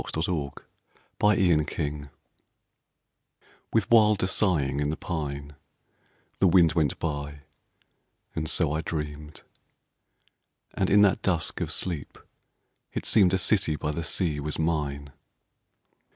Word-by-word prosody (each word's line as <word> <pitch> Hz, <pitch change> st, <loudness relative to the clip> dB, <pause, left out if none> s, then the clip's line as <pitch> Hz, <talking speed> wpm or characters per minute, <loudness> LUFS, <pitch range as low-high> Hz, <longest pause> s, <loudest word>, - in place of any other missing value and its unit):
6 80 Hz, +4 st, -2 dB
9 90 Hz, -, 0 dB
• 70 Hz, -3 st, -5 dB, 0.6 s
TO -, -, +3 dB
INA 85 Hz, -5 st, +3 dB
COOLBRITH 75 Hz, -1 st, -4 dB, 1.6 s
With 110 Hz, -3 st, 0 dB
wilder 105 Hz, -4 st, +5 dB
sighing 80 Hz, -9 st, +1 dB
in 75 Hz, 0 st, 0 dB
the 80 Hz, -, -3 dB
pine 70 Hz, -4 st, -5 dB, 0.8 s
The 95 Hz, -, +4 dB
wind 85 Hz, -3 st, +5 dB
went 75 Hz, -5 st, 0 dB
by, 75 Hz, -2 st, -4 dB, 0.9 s
and 80 Hz, -1 st, -3 dB
so 80 Hz, -5 st, +2 dB
I 80 Hz, +1 st, -1 dB
dreamed; 75 Hz, -1 st, -6 dB, 1.3 s
And 95 Hz, -, 0 dB
in 100 Hz, +1 st, +6 dB
that 100 Hz, -, +3 dB
dusk 85 Hz, -5 st, -1 dB
of -, -, -2 dB
sleep 85 Hz, -6 st, -4 dB, 0.7 s
it -, -, -5 dB
seemed 95 Hz, -4 st, +4 dB
A -, -, +2 dB
city 95 Hz, -4 st, +2 dB
by 75 Hz, 0 st, -3 dB
the 85 Hz, +2 st, -4 dB
sea 80 Hz, -2 st, +1 dB
was 75 Hz, +1 st, -4 dB
mine. 75 Hz, -3 st, -2 dB
80 Hz, 130 wpm, -26 LUFS, 75-90 Hz, 1.6 s, in